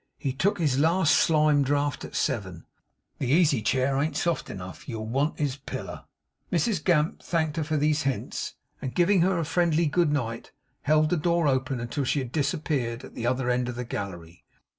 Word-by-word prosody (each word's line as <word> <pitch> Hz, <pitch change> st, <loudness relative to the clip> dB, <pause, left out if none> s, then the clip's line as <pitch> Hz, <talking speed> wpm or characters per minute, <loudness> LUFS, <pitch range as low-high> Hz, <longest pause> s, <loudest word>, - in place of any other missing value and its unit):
'He 135 Hz, -, -2 dB
took 190 Hz, +10 st, +1 dB
his 145 Hz, -6 st, +1 dB
last 165 Hz, +2 st, +3 dB
slime 150 Hz, -2 st, +4 dB
draught 145 Hz, +1 st, 0 dB
at -, -, -8 dB
seven. 95 Hz, -, -2 dB, 0.5 s
The 130 Hz, -, -1 dB
easy 150 Hz, -5 st, +4 dB
chair 130 Hz, +5 st, +1 dB
an't 155 Hz, +3 st, -1 dB
soft 170 Hz, -2 st, -1 dB
enough. 95 Hz, +7 st, -8 dB
You'll 110 Hz, -3 st, -4 dB
want 135 Hz, +7 st, 0 dB
his 145 Hz, -2 st, -1 dB
piller.' 140 Hz, -, -7 dB, 0.5 s
Mrs 175 Hz, 0 st, +1 dB
Gamp 155 Hz, -2 st, +2 dB
thanked 160 Hz, -3 st, -1 dB
her 160 Hz, -, +1 dB
for 155 Hz, +1 st, -1 dB
these 150 Hz, +1 st, +2 dB
hints, 135 Hz, -2 st, -3 dB, 0.3 s
and 130 Hz, -, -5 dB
giving 180 Hz, +1 st, +4 dB
her 185 Hz, +1 st, +2 dB
a 165 Hz, -, -1 dB
friendly 170 Hz, 0 st, +2 dB
good 160 Hz, 0 st, +2 dB
night, 115 Hz, -6 st, -3 dB, 0.3 s
held 155 Hz, +1 st, +3 dB
the 175 Hz, -, +2 dB
door 170 Hz, 0 st, +1 dB
open 130 Hz, -1 st, 0 dB
until 120 Hz, +5 st, -3 dB
she 135 Hz, -, 0 dB
had 130 Hz, -4 st, -3 dB
disappeared 135 Hz, -5 st, -1 dB
at -, -, -11 dB
the 120 Hz, -, -3 dB
other 130 Hz, 0 st, 0 dB
end 125 Hz, 0 st, 0 dB
of 125 Hz, -, -5 dB
the 125 Hz, 0 st, -4 dB
gallery. 90 Hz, -6 st, -6 dB
145 Hz, 190 wpm, -26 LUFS, 125-160 Hz, 0.5 s, slime